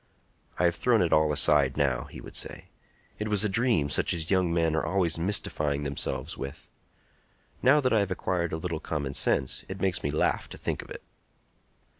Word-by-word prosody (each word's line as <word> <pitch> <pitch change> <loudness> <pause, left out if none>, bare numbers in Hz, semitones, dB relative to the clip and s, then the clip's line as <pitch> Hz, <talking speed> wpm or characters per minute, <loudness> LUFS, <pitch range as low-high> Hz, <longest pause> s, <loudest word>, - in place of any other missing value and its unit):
"I - - 0
have 85 -1 +3
thrown 115 -6 +3
it 85 - 0
all 75 -1 +3
aside 70 -2 +3
now," 65 -4 0
he - - -11
would - - -11
say. - - -3 0.5
"It 105 - -2
was 105 -1 +3
a - - +3
dream 100 - +2
such 70 - +2
as 80 +1 -1
young 90 -3 +2
men 80 -2 +1
are 80 - 0
always 85 -1 0
mystifying 75 -6 0
themselves 70 +1 -2
with. 70 0 -8 0.9
Now 140 +4 +5
that 130 -3 +1
I 110 - +4
have 100 -1 0
acquired 90 -2 -2
a 80 - -2
little 80 -1 -4
common 70 -4 -4
sense, 65 -1 0
it 95 0 -6
makes 95 0 +1
me 70 - -2
laugh 75 - 0
to - - -9
think - - -3
of - - -15
it." - - -9
85 Hz, 200 wpm, -27 LUFS, 75-95 Hz, 0.9 s, Now